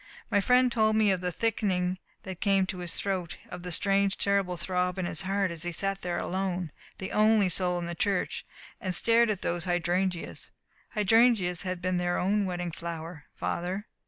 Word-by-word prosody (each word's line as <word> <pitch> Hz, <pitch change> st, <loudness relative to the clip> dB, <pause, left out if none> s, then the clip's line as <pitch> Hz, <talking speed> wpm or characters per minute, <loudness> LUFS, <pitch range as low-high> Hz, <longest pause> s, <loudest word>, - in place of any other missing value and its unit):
My 205 Hz, -2 st, +4 dB
friend 250 Hz, +3 st, +4 dB
told 220 Hz, -2 st, +3 dB
me 215 Hz, -2 st, +4 dB
of 185 Hz, -2 st, 0 dB
the 180 Hz, -1 st, -1 dB
thickening 185 Hz, -4 st, 0 dB, 0.2 s
that 185 Hz, -2 st, -7 dB
came 195 Hz, -2 st, +3 dB
in 185 Hz, -, -8 dB
his 175 Hz, -1 st, -2 dB
throat, 185 Hz, -4 st, -2 dB
of 180 Hz, -, -7 dB
the 180 Hz, 0 st, -5 dB
strange, 195 Hz, +2 st, +2 dB
terrible 200 Hz, -3 st, +1 dB
throb 180 Hz, +1 st, -1 dB
in 185 Hz, -, -1 dB
his 165 Hz, -3 st, 0 dB
heart 195 Hz, -1 st, 0 dB
as 165 Hz, -2 st, -5 dB
he 175 Hz, +1 st, 0 dB
sat 195 Hz, +3 st, -1 dB
there 175 Hz, -1 st, -2 dB
alone 185 Hz, -3 st, -2 dB, 0.3 s
the 190 Hz, -, -5 dB
only 215 Hz, -2 st, +4 dB
soul 180 Hz, 0 st, +1 dB
in 175 Hz, -, -3 dB
the 170 Hz, -, -4 dB
church 195 Hz, +2 st, -1 dB, 0.4 s
and 185 Hz, -2 st, -2 dB
stared 235 Hz, 0 st, +4 dB
at 205 Hz, -3 st, -2 dB
those 175 Hz, 0 st, -1 dB
hydrangeas. 175 Hz, 0 st, -1 dB, 0.5 s
Hydrangeas 210 Hz, -4 st, +4 dB
had 185 Hz, -2 st, -4 dB
been 185 Hz, 0 st, +1 dB
their 175 Hz, 0 st, 0 dB
own 200 Hz, +2 st, +1 dB
wedding 175 Hz, -2 st, -3 dB
flower, 165 Hz, -1 st, -7 dB
Father. 185 Hz, +4 st, -3 dB
185 Hz, 190 wpm, -28 LUFS, 175-200 Hz, 0.5 s, My